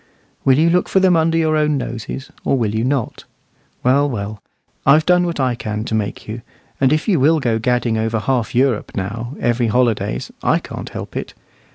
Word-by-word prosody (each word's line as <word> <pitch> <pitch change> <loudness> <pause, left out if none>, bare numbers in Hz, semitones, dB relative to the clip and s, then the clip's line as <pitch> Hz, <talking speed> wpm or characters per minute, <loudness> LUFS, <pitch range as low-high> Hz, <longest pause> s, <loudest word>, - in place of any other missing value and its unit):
Will 130 -1 +4
you 165 +2 +4
look 180 +1 +1
for 190 - +3
them 185 -2 +4
under 165 0 +2
your 160 -1 +2
own 150 -1 +2
noses, 125 +1 -5
or 135 - +1
will 110 -4 0
you 110 +1 0
not? 130 -2 -2 0.6
Well, 140 +3 +3
well, 105 -3 -5 0.4
I've 155 +3 +5
done 180 0 +3
what 170 -3 -3
I 130 -2 +2
can 105 -2 -4
to 115 - -5
make 105 -2 -2
you; 110 +2 -6 0.4
and 135 -1 +3
if 155 +1 +1
you 185 -8 +3
will 155 +4 +4
go 115 -5 0
gadding 120 -1 0
over 115 +1 0
half 120 +2 -1
Europe 125 -3 +1
now, 115 +7 -4
every 120 0 +1
holidays, 115 - 0
I - - +3
can't - - -7
help - - -8
it. - - -5
125 Hz, 200 wpm, -19 LUFS, 110-150 Hz, 0.6 s, I've